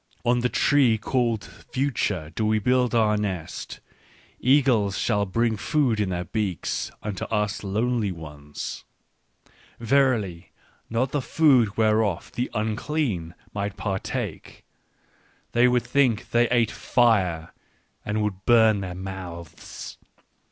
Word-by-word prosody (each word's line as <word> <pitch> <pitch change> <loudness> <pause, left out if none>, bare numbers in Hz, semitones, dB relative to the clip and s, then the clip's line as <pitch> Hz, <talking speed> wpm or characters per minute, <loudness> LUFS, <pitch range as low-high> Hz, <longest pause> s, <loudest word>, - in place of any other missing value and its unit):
" - - -36
On 120 +1 +3
the 125 +1 +1
tree 130 -6 +3
called 115 -1 0
Future 105 - -3
do 110 - -2
we 110 0 +2
build 125 +3 +2
our 110 -2 +3
nest: 95 -6 -4 0.6
eagles 125 -8 +3
shall 105 -1 +1
bring 115 +3 +1
food 130 -1 +1
in 105 -3 0
their 90 -1 -2
beaks 100 -2 -2
unto 105 -3 -4
us 105 -1 -1
lonely 110 +1 0
ones! 75 -3 -7 0.4
" - - -31
Verily 115 -8 +1 0.4
not 125 +3 0
the 145 - 0
food 130 -8 +3
whereof 110 -4 +1
the 125 - -2
unclean 110 - -2 0.2
might 100 -1 -3
partake. 95 -3 -4 0.9
They 120 +1 +4
would 125 -1 +2
think 125 -6 +1
they 120 0 +3
ate 120 -3 +2
fire 95 -10 +1 0.5
and 105 0 -1
would 100 -2 -3
burn 110 -3 +5
their 90 -2 -5
mouths 90 -3 -8
110 Hz, 125 wpm, -25 LUFS, 95-120 Hz, 0.9 s, burn